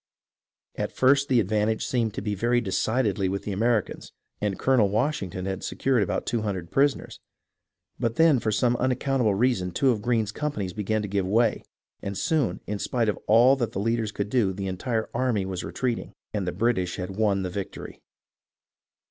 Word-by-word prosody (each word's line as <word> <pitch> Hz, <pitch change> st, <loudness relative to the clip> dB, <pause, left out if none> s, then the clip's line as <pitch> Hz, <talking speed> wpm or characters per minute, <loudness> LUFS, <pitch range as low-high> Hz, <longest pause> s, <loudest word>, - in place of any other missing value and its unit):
At -, -, -2 dB
first 140 Hz, +2 st, +3 dB
the 125 Hz, -2 st, +4 dB
advantage 110 Hz, +1 st, 0 dB
seemed 115 Hz, -4 st, -1 dB
to -, -, -4 dB
be 105 Hz, -1 st, -1 dB
very 120 Hz, +5 st, +1 dB
decidedly 105 Hz, -2 st, 0 dB
with 100 Hz, +1 st, -3 dB
the 105 Hz, -, -4 dB
Americans, 110 Hz, +1 st, -1 dB, 0.3 s
and 105 Hz, -2 st, -1 dB
Colonel 125 Hz, -7 st, +3 dB
Washington 105 Hz, -, -1 dB
had 95 Hz, -1 st, -4 dB
secured 130 Hz, -4 st, +1 dB
about 100 Hz, -, -1 dB
two 120 Hz, -2 st, -1 dB
hundred 95 Hz, -5 st, -4 dB
prisoners; 140 Hz, 0 st, +1 dB, 0.8 s
but 115 Hz, -1 st, -1 dB
then 160 Hz, -5 st, +5 dB
for 110 Hz, -, -1 dB
some 120 Hz, +3 st, +2 dB
unaccountable 130 Hz, -3 st, +1 dB
reason 100 Hz, -5 st, +1 dB
two 130 Hz, +9 st, +2 dB
of 110 Hz, -4 st, -2 dB
Greene's 110 Hz, -2 st, 0 dB
companies 110 Hz, -10 st, -3 dB
began 105 Hz, +1 st, -1 dB
to -, -, -3 dB
give 100 Hz, -1 st, -1 dB
way, 115 Hz, +3 st, +2 dB, 0.4 s
and 100 Hz, -1 st, -4 dB
soon, 140 Hz, -, 0 dB
in 105 Hz, 0 st, -4 dB
spite 120 Hz, -4 st, 0 dB
of 105 Hz, -, -2 dB
all 120 Hz, +5 st, +6 dB
that 120 Hz, -3 st, -2 dB
the -, -, -2 dB
leaders 115 Hz, 0 st, 0 dB
could 100 Hz, -1 st, -4 dB
do, 105 Hz, -7 st, +2 dB
the 100 Hz, +1 st, -5 dB
entire 110 Hz, +5 st, -2 dB
army 120 Hz, -7 st, 0 dB
was 95 Hz, -1 st, -4 dB
retreating, 125 Hz, -3 st, -3 dB, 0.2 s
and 100 Hz, -4 st, -2 dB
the -, -, 0 dB
British 95 Hz, -6 st, 0 dB
had 90 Hz, +1 st, -5 dB
won 100 Hz, -2 st, +1 dB
the 90 Hz, -, -3 dB
victory. 100 Hz, 0 st, -7 dB
110 Hz, 180 wpm, -26 LUFS, 100-125 Hz, 0.8 s, all